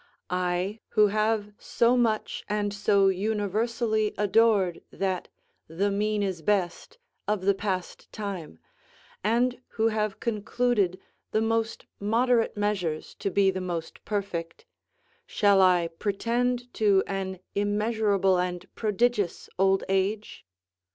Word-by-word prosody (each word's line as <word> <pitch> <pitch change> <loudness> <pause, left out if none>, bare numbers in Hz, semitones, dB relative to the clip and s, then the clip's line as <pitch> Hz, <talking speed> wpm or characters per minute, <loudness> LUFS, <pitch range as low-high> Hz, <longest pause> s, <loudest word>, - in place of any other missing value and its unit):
I, 180 +3 -1
who 210 -2 +4
have 215 0 0
so 235 +1 +2
much 230 -3 0
and 205 -1 -1
so 200 -1 +3
universally 215 +2 0
adored 205 -3 +3
that 190 -2 -2 0.4
"The 195 +6 -1
mean 210 +1 0
is 185 -4 -2
best," 185 - -1 0.3
of 210 -2 0
the 200 +1 +3
passed 190 -2 -4
time, 195 - -6 0.7
and 240 +4 +1 0.2
who 225 0 +3
have 215 -2 -2
concluded 215 -3 0 0.3
the 215 - +2
most 225 0 -1
moderate 230 +2 +2
measures 190 -7 -1
to - - -1
be 195 0 +3
the 190 0 -4
most 170 -3 -5
perfect, 190 -5 -4 0.6
shall 200 -2 +4
I 180 -2 +4
pretend 245 +4 -1
to 200 -3 +3
an 190 -1 -3 0.2
immeasurable 205 -2 +1
and 180 0 -2
prodigious 215 -2 0
old 195 0 +3
age? 195 - -1
205 Hz, 115 wpm, -27 LUFS, 190-220 Hz, 0.7 s, who